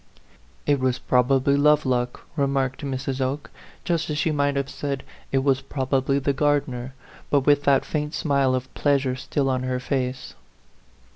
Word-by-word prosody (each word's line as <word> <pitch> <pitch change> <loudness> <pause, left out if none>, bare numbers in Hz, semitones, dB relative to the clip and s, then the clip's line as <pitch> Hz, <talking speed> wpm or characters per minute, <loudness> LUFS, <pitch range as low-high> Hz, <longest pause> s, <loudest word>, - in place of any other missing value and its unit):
"It 145 -1 +2
was 130 -1 +1
probably 130 +2 +2
Lovelock," 140 -4 +2
remarked 135 -2 0
Mrs. 135 -1 -3
Oke, 135 +3 -2 0.3
just 170 -2 -1
as 150 - -2
she 155 +2 +1
might 145 -1 +1
have 140 -1 -1
said, 140 -1 -4
" - - -27
It 135 -1 +2
was 135 -1 +2
probably 135 0 0
the 140 0 0
gardener," 135 -3 0 0.3
but 145 - +3
with 145 +1 +3
that 140 -1 +4
faint 150 0 -3
smile 140 -3 +2
of 130 0 -5
pleasure 140 -3 +1
still 135 +1 -1
in 130 -1 0
her 130 0 -1
face. 125 -1 -3
135 Hz, 160 wpm, -24 LUFS, 130-145 Hz, 0.3 s, that